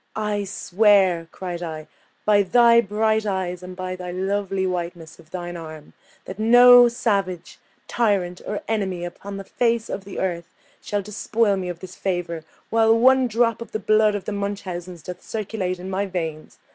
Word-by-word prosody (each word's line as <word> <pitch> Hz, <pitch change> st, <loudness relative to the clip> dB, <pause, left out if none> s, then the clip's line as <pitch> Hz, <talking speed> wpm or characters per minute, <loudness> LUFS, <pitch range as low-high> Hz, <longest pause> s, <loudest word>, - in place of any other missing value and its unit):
"I 210 Hz, -1 st, -1 dB
swear," 190 Hz, -3 st, +2 dB
cried 180 Hz, -2 st, -6 dB
I, 160 Hz, -2 st, -6 dB, 0.4 s
"by 205 Hz, -1 st, +5 dB
thy 235 Hz, +4 st, +5 dB
bright 220 Hz, +1 st, 0 dB
eyes, 185 Hz, -2 st, -2 dB
and 180 Hz, 0 st, -9 dB
by 185 Hz, 0 st, -4 dB
the 180 Hz, -1 st, -6 dB
lovely 195 Hz, +1 st, -1 dB
whiteness 175 Hz, -3 st, -4 dB
of 160 Hz, -2 st, -18 dB
thine 175 Hz, 0 st, -6 dB
arm, 155 Hz, -2 st, -10 dB, 0.3 s
that 190 Hz, +2 st, -8 dB
no 245 Hz, +2 st, +8 dB
savage, 195 Hz, -7 st, -2 dB, 0.3 s
tyrant, 195 Hz, -6 st, 0 dB
or 210 Hz, -, -4 dB
enemy 190 Hz, -5 st, -2 dB
upon 195 Hz, +3 st, -8 dB
the 195 Hz, -, -6 dB
face 230 Hz, +2 st, 0 dB
of 195 Hz, -, -4 dB
the 195 Hz, 0 st, -9 dB
earth 170 Hz, -3 st, -3 dB, 0.3 s
shall 205 Hz, -1 st, -2 dB
despoil 210 Hz, +1 st, 0 dB
me 185 Hz, -2 st, -4 dB
of 170 Hz, -1 st, -7 dB
this 185 Hz, -, -9 dB
favour, 175 Hz, -4 st, -3 dB, 0.3 s
while 225 Hz, 0 st, +4 dB
one 260 Hz, +2 st, +5 dB
drop 230 Hz, 0 st, +1 dB
of 235 Hz, -, -9 dB
the -, -, 0 dB
blood 215 Hz, 0 st, +3 dB
of 200 Hz, -, -5 dB
the -, -, -3 dB
Munchausens 185 Hz, -4 st, -5 dB
doth 180 Hz, +2 st, -8 dB
circulate 200 Hz, -4 st, -3 dB
in 180 Hz, +1 st, -8 dB
my 195 Hz, +1 st, -2 dB
veins! 160 Hz, -4 st, -5 dB
195 Hz, 170 wpm, -23 LUFS, 180-215 Hz, 0.4 s, no